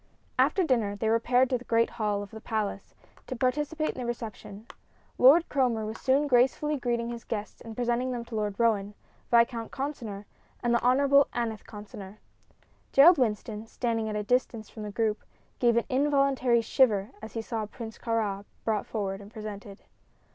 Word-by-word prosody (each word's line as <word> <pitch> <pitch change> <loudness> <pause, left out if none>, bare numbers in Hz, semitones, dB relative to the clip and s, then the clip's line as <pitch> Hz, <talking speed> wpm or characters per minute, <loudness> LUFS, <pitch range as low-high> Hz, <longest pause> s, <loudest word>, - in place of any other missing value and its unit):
After 385 - +3
dinner 230 -10 +1
they 220 +2 -1
repaired 245 +3 +3
to 250 - +1
the - - -12
great 230 -1 +2
hall 210 -2 -1
of 200 - -11
the 220 - -9
palace, 215 -4 -3 0.3
to 260 - -4
participate 295 +5 0
in - - -16
the - - -4
reception. 220 -3 -6 0.5
Lord 295 +7 +7
Cromer 245 -6 +1
was 220 +1 -6
soon 275 +2 +3
gracefully 265 +3 +2
greeting 240 -3 -1
his 235 -1 -7
guests 210 -2 -5
and 225 -1 -9
presenting 245 +1 0
them 240 -2 -4
to 230 - -8
Lord 210 -2 -1
Roane, 210 -3 +1 0.3
Viscount 235 -1 +3
Consinor 235 -8 -5 0.4
and 240 0 +2
the 235 - +2
Honorable 280 +3 +4
Aneth 225 -3 -3
Consinor. 205 -1 -10 0.7
Gerald 310 +4 +7
Winston, 215 -2 -1
standing 225 -2 -2
at 210 - -3
a 210 - -1
distance 230 -1 -1
from 220 - -9
the 210 -1 -5
group, 215 0 0 0.4
gave 235 -2 +3
an 235 - +2
involuntary 275 -3 +2
shiver 220 -3 +2
as 220 -1 -9
he 225 - -3
saw 220 -2 -3
Prince 225 0 -9
Kāra 215 -4 -1 0.2
brought 215 -2 0
forward 195 -3 -3
and 200 +1 -13
presented. 210 -2 -8
230 Hz, 175 wpm, -28 LUFS, 215-255 Hz, 0.7 s, Lord